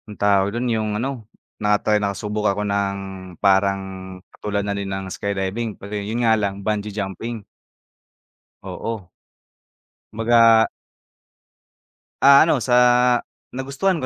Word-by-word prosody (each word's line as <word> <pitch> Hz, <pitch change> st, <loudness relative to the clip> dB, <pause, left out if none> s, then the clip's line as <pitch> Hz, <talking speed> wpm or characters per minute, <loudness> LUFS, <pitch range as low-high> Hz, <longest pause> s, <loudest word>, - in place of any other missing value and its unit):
Anong 105 Hz, -, -10 dB
tawag 100 Hz, -1 st, +3 dB
dun 120 Hz, -, -2 dB
yung 110 Hz, -1 st, -1 dB
ano, 120 Hz, -2 st, -4 dB, 0.3 s
na-try 105 Hz, 0 st, +2 dB
nakasubok 105 Hz, +1 st, -1 dB
ako 105 Hz, +1 st, -1 dB
ng 100 Hz, -1 st, -1 dB, 0.4 s
parang 100 Hz, 0 st, +2 dB, 0.5 s
katulad 100 Hz, -1 st, -3 dB
na 100 Hz, -, -1 dB
din 100 Hz, -1 st, -4 dB
ng 95 Hz, -1 st, -5 dB
skydiving 100 Hz, +3 st, -3 dB
pero 100 Hz, +2 st, -10 dB
yun 105 Hz, +4 st, -2 dB
nga 110 Hz, -, +5 dB
lang 100 Hz, -2 st, -2 dB
bungee 105 Hz, -1 st, -1 dB
jumping. 105 Hz, +2 st, -5 dB, 1.2 s
Oo. 110 Hz, -6 st, -6 dB, 1.0 s
Kumbaga. 115 Hz, 0 st, +5 dB, 1.6 s
Ah, 140 Hz, +2 st, +8 dB
ano 150 Hz, -6 st, +1 dB
sa 125 Hz, 0 st, +2 dB, 0.7 s
nagustuhan 140 Hz, +9 st, -1 dB
ko 135 Hz, -, -4 dB
105 Hz, 120 wpm, -21 LUFS, 100-115 Hz, 1.6 s, Ah